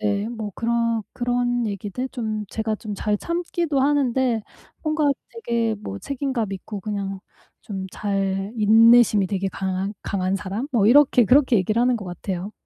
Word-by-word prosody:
네 205 0 0
뭐 220 -3 -5
그런-그런 235 +1 0
얘기들 205 +6 -4
좀 215 -4 -3
제가 220 -1 -1
좀 210 -1 -6
잘 210 +1 0
참기도 340 - -1
하는데 260 -5 +2 0.4
뭔가 310 -2 +1 0.2
되게 235 - -1
뭐 100 - -6
책임감 260 -7 -3
있고 195 +1 -6
그냥 195 -1 -4 0.4
좀 190 -2 -5
잘 195 0 -2
인내심이 225 -1 +6
되게 195 0 -1
강한 190 +1 -3
강한 190 0 -1
사람? 210 +7 -4
뭐 210 -4 +3
이렇게 260 -1 +6
그렇게 255 +1 +4
얘기를 215 +5 +1
하는 250 0 +3
것 210 - -7
같아요. 180 +2 -5
220 Hz, 295 characters per minute, -23 LUFS, 200-245 Hz, 0.4 s, 인내심이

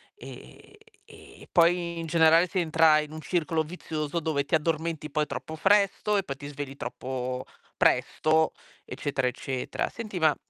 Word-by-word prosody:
E - - -13 0.3
e - - -16
ehm, - - -18
e - - -15
poi 170 -1 +3
in 165 - -5
generale 165 +1 +5
si 185 +1 -2
entra 160 -2 +4
in 150 0 -5
un 155 0 -7
circolo 165 -2 0
vizioso 155 -1 -4
dove 150 -3 -1
ti - - -11
addormenti 160 0 -1
poi 150 +1 0
troppo 160 - -6
presto 200 +3 +2
e 195 - +1
poi 140 - -5
ti 140 +1 -9
svegli 145 -1 -6
troppo 130 -1 -4 0.3
presto, 160 0 +2 0.3
eccetera, 135 -3 -2
eccetera. 125 0 -3
Senti 215 -5 -7
ma 155 -2 +4
160 Hz, 165 wpm, -27 LUFS, 145-170 Hz, 0.3 s, generale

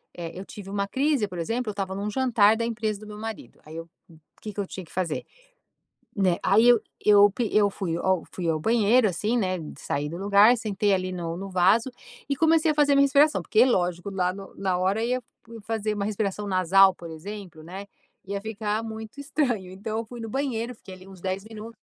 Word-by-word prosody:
eh, 170 -1 -6
eu 195 - -7
tive 200 -2 -10
uma 200 0 -2
crise, 270 -3 +1
por 180 -2 -7
exemplo, 230 +7 -2
eu - - -1
estava 195 -2 -4
em - - -5
um 205 +1 -3
jantar 225 -3 +3
da 230 - -2
empresa 215 -3 -2
do 215 - -11
meu 210 0 -9
marido, 220 0 -8
aí 155 +1 -11
eu 165 0 -7 0.5
que 210 -1 -7
que 205 - -7
eu 195 - -2
tinha 185 -2 -8
que - - -21
fazer, 180 -4 -2 0.9
né, 185 -4 +2
aí 210 +5 +4
eu 240 -2 +6 0.2
eu 205 -1 +7
p 220 +2 -2
eu 205 -1 +4
fui 170 -4 -3
ao 185 -2 +1
fui 175 -3 -3
ao 160 - +1
banheiro, 225 +5 +3
assim, 210 +6 -1
né, 185 -5 0 0.2
saí 145 +1 -3
do 165 - -6
lugar, 205 +5 +5
sentei 205 -2 0
ali 185 0 -2
no 170 -2 -4
no 195 +2 -6
vaso, 195 +7 +3 0.4
e 280 - +1
comecei 320 +1 +3
a - - +1
fazer 290 -1 +4
minha 280 0 +5
respiração, 280 - +4
porque 215 +7 +3
lógico 180 -6 0
lá 185 -2 0
no 195 0 -11
na 190 -2 -1
hora 195 +5 +1
ia 250 +1 -1 0.4
fazer 215 -1 -2
uma 200 -1 -2
respiração 210 -1 -2
nasal, 190 +1 +5
por 170 -2 -10
exemplo, 180 0 -9
né, 190 +5 -8 0.4
ia 200 +1 -4
ficar 215 0 -3
muito 220 +4 -8
estranho 260 -10 -1
então 215 +4 -5
eu 230 - -3
fui 240 +1 -10
no 225 - -5
banheiro, 250 -2 -2
fiquei 195 -4 -12
ali 185 +1 -15
uns 190 -2 -13
10 190 +1 -3
minutos 220 +1 -10
205 Hz, 220 wpm, -25 LUFS, 185-225 Hz, 0.9 s, eu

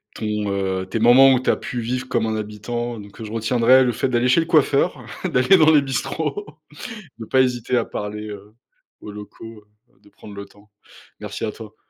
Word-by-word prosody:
ton, 110 - -5 0.3
heu, 95 -1 -2
tes 115 - -2
moments 130 +4 +7
où 125 - +2
tu 130 - -2
as - - +4
pu 125 - -5
vivre 125 +3 -3
comme 120 -3 0
un 110 0 -2
habitant. 115 +2 -5
Donc, 100 +2 -13
heu, - - -5
je 105 - -9
retiendrai 120 +3 +3
le 125 - +1
fait 130 - -1
d'aller 120 0 +1
chez 125 - +4
le - - -3
coiffeur, 150 +2 +2 0.2
d'aller 165 +3 +4
dans 160 -1 +5
les 150 -2 +5
bistrots, 150 +7 -3 0.7
de 110 - -6
pas 130 +3 +3
hésiter 125 -1 0
à 115 - 0
parler, 105 +1 -6
heu, 105 +1 -11 0.5
aux 105 - -9
locaux, 105 +1 -11 0.3
heu, - - -33
de - - -21
prendre 100 0 -13
le 100 0 -7
temps. 105 +1 -22 0.5
Merci - - -5
à 105 - -3
toi. 110 -1 -12
115 Hz, 210 wpm, -21 LUFS, 105-130 Hz, 0.7 s, moments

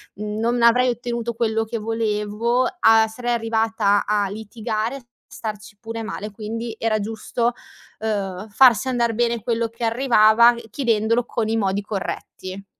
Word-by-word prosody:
non 220 +4 -1
avrei 250 +2 +5
ottenuto 235 -1 -3
quello 225 -1 0
che 230 +1 -4
volevo 225 +2 0
a 225 -4 +5
sarei 240 +2 -3
arrivata 225 -3 +1
a 205 -1 +1
litigare, 220 +4 -4 0.2
starci 210 -1 -7
pure 225 0 -6
male. 215 -1 -5
Quindi 225 +2 -5
era 220 -1 +1
giusto, 225 +3 -2 0.5
ehm, 205 -2 -3
farsi 245 +2 +5
andar 235 -2 +1
bene 235 -1 0
quello 230 -1 0
che 230 +1 -9
arrivava 235 -1 +5 0.2
chiedendolo 230 -2 +1
con 225 -2 -2
i 225 - +1
modi 200 -1 0
corretti. 195 -1 -6
225 Hz, 135 wpm, -22 LUFS, 210-235 Hz, 0.5 s, avrei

